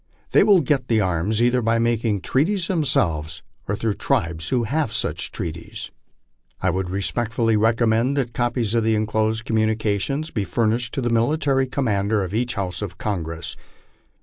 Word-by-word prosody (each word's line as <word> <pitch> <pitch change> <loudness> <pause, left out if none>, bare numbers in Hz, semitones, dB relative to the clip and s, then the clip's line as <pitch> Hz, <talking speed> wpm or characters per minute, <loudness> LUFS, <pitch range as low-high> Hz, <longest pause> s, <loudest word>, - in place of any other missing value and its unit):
They - - +6
will 195 -4 +6
get 135 -3 0
the 115 -2 +2
arms 95 +4 +1
either 125 +1 +3
by 115 0 +2
making 115 -3 +1
treaties 170 - +1
themselves 85 - 0 0.2
or 105 - 0
through 110 0 -1
tribes 85 -2 -1
who 125 -2 +1
have 145 +1 -1
such - - -1
treaties. 85 0 -6 0.7
I 95 - +1
would 95 0 -2
respectfully 115 +4 0
recommend 115 +4 +2
that 120 -4 -1
copiee 120 -3 0
of 115 -1 +2
the 110 0 +2
enclosed 110 +1 0
communications 110 +6 0
be 105 - -1
furnished 115 +3 0
to 135 - -1
the 120 -1 0
Military 135 +3 +2
Committee 110 -6 0
of 95 -3 -1
each 120 +3 -1
house 95 -2 -3
of 95 -4 -5
Congress. 85 -5 -4
110 Hz, 160 wpm, -22 LUFS, 100-125 Hz, 0.7 s, They